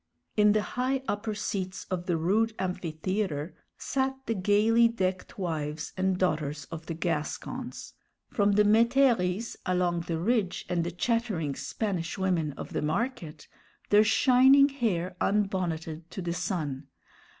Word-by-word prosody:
In 210 Hz, -1 st, +5 dB
the 215 Hz, -1 st, +2 dB
high 260 Hz, +3 st, -1 dB
upper 210 Hz, +1 st, -2 dB
seats 190 Hz, -2 st, -3 dB
of 180 Hz, -1 st, -3 dB
the 175 Hz, -2 st, +1 dB
rude 215 Hz, +7 st, +1 dB
amphitheatre 180 Hz, -2 st, -2 dB, 0.2 s
sat 265 Hz, 0 st, -1 dB
the 230 Hz, -, 0 dB
gayly 215 Hz, +4 st, +4 dB
decked 190 Hz, -5 st, -3 dB
wives 155 Hz, -4 st, -3 dB
and 185 Hz, 0 st, +1 dB
daughters 150 Hz, -5 st, -1 dB
of 160 Hz, 0 st, -7 dB
the 165 Hz, -, -3 dB
Gascons, 165 Hz, -, -4 dB, 0.4 s
from 205 Hz, -1 st, +2 dB
the 210 Hz, +1 st, +5 dB
métairies 230 Hz, -2 st, +3 dB
along 180 Hz, -2 st, 0 dB
the 165 Hz, -, -1 dB
Ridge, 195 Hz, +1 st, 0 dB
and 175 Hz, -2 st, 0 dB
the 170 Hz, -, -2 dB
chattering 200 Hz, -, -1 dB
Spanish 185 Hz, +1 st, -3 dB
women 175 Hz, -6 st, 0 dB
of -, -, -8 dB
the -, -, -1 dB
Market, 160 Hz, -, -3 dB, 0.4 s
their 205 Hz, +1 st, +7 dB
shining 265 Hz, +5 st, +6 dB
hair 190 Hz, -10 st, -1 dB
unbonneted 170 Hz, -5 st, -1 dB
to 190 Hz, -, -6 dB
the 170 Hz, -1 st, -2 dB
sun. 160 Hz, -7 st, -3 dB
185 Hz, 140 wpm, -28 LUFS, 170-220 Hz, 0.4 s, their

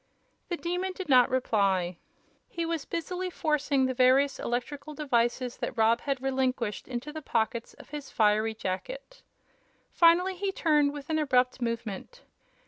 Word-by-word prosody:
The 345 Hz, -, -1 dB
Demon 360 Hz, +3 st, -2 dB
did 370 Hz, -3 st, -7 dB
not 250 Hz, -2 st, +6 dB
reply. 195 Hz, -8 st, +1 dB, 0.5 s
He 335 Hz, -, -3 dB
was 330 Hz, -3 st, -2 dB
busily 360 Hz, +3 st, -3 dB
forcing 295 Hz, -5 st, +1 dB
the 260 Hz, -, 0 dB
various 260 Hz, +2 st, +4 dB
electrical 280 Hz, +5 st, -4 dB
devices 245 Hz, -3 st, 0 dB
that -, -, -4 dB
Rob 225 Hz, +1 st, +3 dB
had 275 Hz, -2 st, -2 dB
relinquished 260 Hz, -5 st, -1 dB
into 260 Hz, +4 st, -5 dB
the 315 Hz, -, -6 dB
pockets 230 Hz, -3 st, -1 dB
of -, -, -15 dB
his 295 Hz, -2 st, -6 dB
fiery 215 Hz, +1 st, +2 dB
jacket. -, -, -5 dB, 0.7 s
Finally 360 Hz, +2 st, +4 dB
he 395 Hz, +1 st, -1 dB
turned 300 Hz, -6 st, +2 dB
with 290 Hz, +1 st, -7 dB
an 315 Hz, -, +1 dB
abrupt 255 Hz, -3 st, +2 dB
movement. 230 Hz, -, -4 dB
270 Hz, 145 wpm, -28 LUFS, 235-325 Hz, 0.7 s, not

